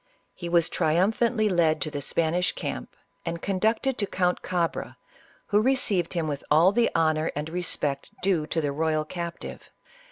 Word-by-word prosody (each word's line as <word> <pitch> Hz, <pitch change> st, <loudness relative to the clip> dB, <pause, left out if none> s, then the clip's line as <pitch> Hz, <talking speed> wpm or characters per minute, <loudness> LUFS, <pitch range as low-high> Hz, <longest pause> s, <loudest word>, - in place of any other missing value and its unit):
He 175 Hz, -, -6 dB
was 170 Hz, -1 st, +4 dB
triumphantly 215 Hz, +7 st, +2 dB
led 165 Hz, -5 st, +2 dB
to 155 Hz, -, -2 dB
the 145 Hz, -, -4 dB
Spanish 170 Hz, +5 st, 0 dB
camp 60 Hz, -, -5 dB, 0.3 s
and 170 Hz, 0 st, -3 dB
conducted 220 Hz, +8 st, 0 dB
to 205 Hz, -, 0 dB
Count 180 Hz, -1 st, 0 dB
Cabra, 175 Hz, -2 st, -2 dB, 0.5 s
who 210 Hz, 0 st, +4 dB
re 265 Hz, +4 st, +3 dB
ceived 190 Hz, -9 st, +1 dB
him 170 Hz, -3 st, -1 dB
with 145 Hz, -2 st, -3 dB
all 160 Hz, +5 st, +6 dB
the 230 Hz, +3 st, +3 dB
honor 155 Hz, -1 st, +2 dB
and 150 Hz, +1 st, -3 dB
respect 155 Hz, -5 st, -2 dB
due 175 Hz, -6 st, +1 dB
to 165 Hz, -, -1 dB
the 145 Hz, -2 st, -1 dB
royal 155 Hz, +1 st, 0 dB
captive. 170 Hz, +1 st, -7 dB
170 Hz, 165 wpm, -26 LUFS, 155-195 Hz, 0.5 s, all